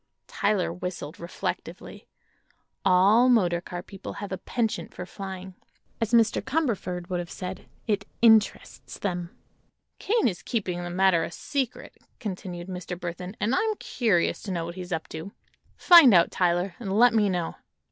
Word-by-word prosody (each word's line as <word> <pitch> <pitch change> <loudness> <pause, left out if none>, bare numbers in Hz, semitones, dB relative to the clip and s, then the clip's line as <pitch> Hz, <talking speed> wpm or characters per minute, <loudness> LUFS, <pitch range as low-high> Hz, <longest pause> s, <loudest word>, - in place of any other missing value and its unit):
Tyler 200 -4 0
whistled, 180 -3 -6
reflectively. 170 +1 -6 0.8
All 195 +7 +5
motor 180 -8 +3
car 175 -1 -7
people 195 -2 -9
have 205 -1 -7
a 190 - -3
penchant 220 -8 -2
for 180 - -6
flying. 190 0 -8 0.5
As 225 -1 0
Mr. 230 -2 +4
Cumberford 225 - -2
would 180 - 0
have 175 -1 -5
said: 185 0 -7 0.2
it 205 -2 0
"interests 220 -2 +2
them." 175 -3 -3 0.7
"Kane 450 - +2
is 180 -5 -3
keeping 185 -6 -2
the 175 - -5
matter 180 -1 +3
a - - -3
secret," 270 +5 -4 0.2
continued 185 -4 -6
Mr. 180 -1 -6
Burthon, 180 +3 -6
"and 225 +4 0
I'm 435 +8 +1
curious 215 - 0
to 200 - -5
know 170 -2 -2
what 170 - -6
he's 180 0 -8
up 160 -2 -2
to. 165 +5 -7 0.4
Find 330 - +8
out, 170 - +5
Tyler, 175 +1 +1
and 200 -4 -2
let 245 +1 +6
me 210 -3 +3
know." 175 -3 -2
190 Hz, 155 wpm, -26 LUFS, 175-220 Hz, 0.8 s, Find